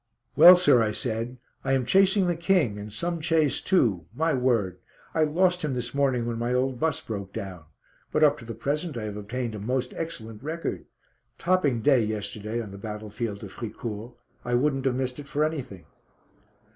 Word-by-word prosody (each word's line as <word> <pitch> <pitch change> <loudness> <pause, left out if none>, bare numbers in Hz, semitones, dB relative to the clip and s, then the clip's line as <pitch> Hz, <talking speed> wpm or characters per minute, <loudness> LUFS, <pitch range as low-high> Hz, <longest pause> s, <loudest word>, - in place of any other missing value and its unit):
"Well, 180 +1 +10
sir," 155 -9 +5
I 110 -1 +1
said, 115 +2 -3 0.3
"I 135 - +1
am 130 -2 +1
chasing 195 - +4
the 175 -1 +1
King, 165 - +1
and 105 +1 -7
some 170 +9 -3
chase 155 -2 +2
too, 110 - +2
my 160 +4 +1
word. 120 -8 +1 0.3
I 160 -1 +3
lost 180 +3 +2
him 145 -4 -1
this 120 -1 -3
morning 135 -4 +1
when 115 -1 -3
my 120 +1 0
old 130 -1 0
bus 160 -3 +1
broke 100 -3 -6
down. 90 -5 -6 0.5
But 155 - +2
up 150 0 +4
to 115 - -11
the 115 - -6
present 150 0 -2
I 115 - -4
have 105 -1 -5
obtained 115 +3 -4
a 105 - -6
most 125 +4 -2
excellent 115 -10 -6
record. 160 +4 -4 0.5
Topping 160 -10 +1
day 135 -2 +4
yesterday 105 +1 -3
on 110 -4 -6
the 100 - -9
battlefield 105 0 -5
of 100 - -8
Fricourt. 115 +1 -6 0.3
I 120 0 0
wouldn't 135 +1 +1
have 130 -2 +2
missed 130 +1 -3
it 145 - -8
for 145 +2 0
anything." 130 - -5
125 Hz, 190 wpm, -26 LUFS, 110-150 Hz, 0.5 s, Well